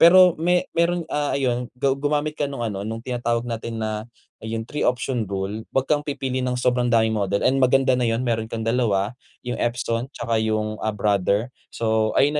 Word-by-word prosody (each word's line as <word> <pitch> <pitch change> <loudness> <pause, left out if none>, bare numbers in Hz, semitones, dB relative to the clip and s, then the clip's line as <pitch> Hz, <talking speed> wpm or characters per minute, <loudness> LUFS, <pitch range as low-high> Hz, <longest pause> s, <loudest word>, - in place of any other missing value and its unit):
Pero 180 +1 +8
me 180 +2 +3
meron, 170 +1 +1
ah, 145 -1 0
ayun 125 -3 0
gu 135 +1 +2
gumamit 145 +2 0
ka 145 -1 -2
nung 135 -4 -4
ano 105 -3 -3
nung 115 +1 -5
tinatawag 120 -2 -1
natin 115 -1 -4
na 110 +1 -3 0.3
yung 110 0 -4
3 150 +5 -5
option 125 -3 0
rule 100 +2 -3 0.2
wag 135 - +3
kang 145 +1 +2
pipili 135 -3 -3
ng 125 -1 -1
sobrang 125 0 +1
daming 110 -1 +3
model 100 -2 0
and 135 +1 +3
maganda 130 +1 +4
na 125 -2 +2
yun 115 +3 0
meron 110 -2 -1
kang 115 0 -4
2 110 -3 +1 0.3
yung 125 0 -3
Epson 120 0 -1
tsaka 115 -1 0
yung, 110 -1 -1
ah, 110 - -1
Brother, 105 +2 +1 0.2
so 110 -1 0
ayun 145 +2 +4
120 Hz, 195 wpm, -23 LUFS, 110-135 Hz, 0.3 s, Pero